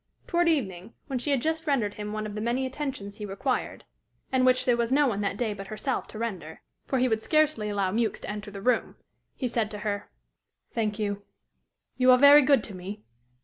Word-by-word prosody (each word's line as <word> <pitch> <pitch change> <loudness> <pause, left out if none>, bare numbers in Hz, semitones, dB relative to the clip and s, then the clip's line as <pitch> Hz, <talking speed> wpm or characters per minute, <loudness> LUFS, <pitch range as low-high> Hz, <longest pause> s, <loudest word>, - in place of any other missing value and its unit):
Toward 345 -1 +2
evening, 205 - -2
when 265 -3 -3
she 270 - -3
had 275 -4 +1
just 320 0 -1
rendered 235 -8 +1
him 210 0 -6
one 215 0 -3
of 210 - -5
the 210 - -4
many 240 +4 0
attentions 260 -7 -5
he 210 - -5
required, 245 +7 -2 0.5
and 255 -1 +3
which 255 0 +3
there 245 - +4
was 235 0 -1
no 290 +2 +4
one 210 -6 0
that 200 0 -1
day 225 -2 -1
but 195 -1 -8
herself 215 +6 -3
to - - -10
render, 195 -8 -5 0.2
for 265 - 0
he 255 0 +3
would 220 -2 0
scarcely 305 -7 +2
allow 200 -2 0
Mewks 220 0 0
to - - -7
enter 210 0 -6
the 200 -1 -9
room, 250 - +1 0.4
he 255 - -2
said 230 -3 -1
to 210 - -6
her: 205 -1 -2 0.6
"Thank 215 -2 -1
you; 205 -2 -2 0.8
you 255 0 +4
are 250 - +8
very 285 +2 +9
good 275 -4 +4
to 205 - -7
me. 195 +3 -7
230 Hz, 220 wpm, -27 LUFS, 205-265 Hz, 0.8 s, very